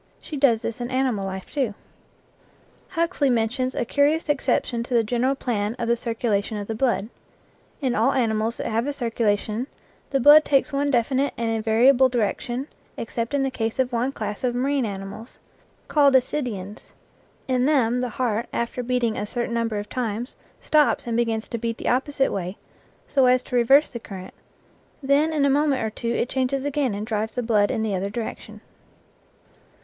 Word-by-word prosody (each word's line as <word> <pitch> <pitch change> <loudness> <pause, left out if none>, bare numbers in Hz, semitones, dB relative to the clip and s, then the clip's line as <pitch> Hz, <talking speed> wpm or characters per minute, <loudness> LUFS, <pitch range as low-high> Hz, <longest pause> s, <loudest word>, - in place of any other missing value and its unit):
She 305 - -8
does 260 -6 +3
this 230 +1 -4
in 240 - -3
animal 255 -7 0
life 190 0 -7
too. 255 -8 -1 1.1
Huxley 335 -5 0
mentions 250 +2 0
a - - -1
curious 295 +5 +1
exception 265 -4 0
to 240 +1 -3
the 230 - +4
general 245 +4 0
plan 220 -4 -2
of 235 - -3
the 235 - +3
circulation 225 -3 -1
of 205 - -4
the 225 - -4
blood. 230 -3 0 0.7
In 260 -3 0
all 235 +5 +3
animals 225 -2 0
that - - -4
have 230 +3 0
a 290 - -1
circulation 225 -2 -1 0.4
the 275 - +1
blood 295 +4 +8
takes 280 0 +1
one 285 +1 +1
definite 265 +2 +1
and 230 -1 -1
invariable 235 +4 +4
direction 240 +3 -2 0.3
except 230 +3 -3
in 275 - +1
the 270 - -1
case 225 -3 -2
of 260 -1 +1
one 240 +3 0
class 210 -4 -5
of 245 -1 0
marine 265 0 +1
animals, 200 +4 -8 0.5
called 285 -3 +4
ascidians; 240 -7 -1 0.6
in 255 0 +2
them 250 -5 +2
the 250 - -1
heart, 230 -1 -1
after 235 +1 -2
beating 245 -2 0
a 210 - -3
certain 240 +1 -3
number 230 -2 -1
of 205 0 -4
times, 235 0 -3 0.3
stops.and 295 -6 +2
begins 225 -1 0
to 235 - -4
beat 230 +1 -3
the - - -2
opposite 270 +1 +1
way, 185 +1 -4 0.5
so 270 -3 +3
as 250 0 +4
to - - -5
reverse 270 +5 +5
the 235 - -6
current; 190 -4 -9 0.7
then 285 +4 +3
in 300 -3 +2
a - - +3
moment 285 -3 +2
or 220 - -2
two 230 +2 -4
it 235 - 0
changes 265 +1 -1
again 280 -6 0
and 205 +1 -4
drives 220 0 -2
the 245 - -2
blood 210 -3 +2
in 220 - -1
the 215 -2 -1
other 195 +1 -1
direction. 220 +2 -6
240 Hz, 180 wpm, -24 LUFS, 220-270 Hz, 1.1 s, blood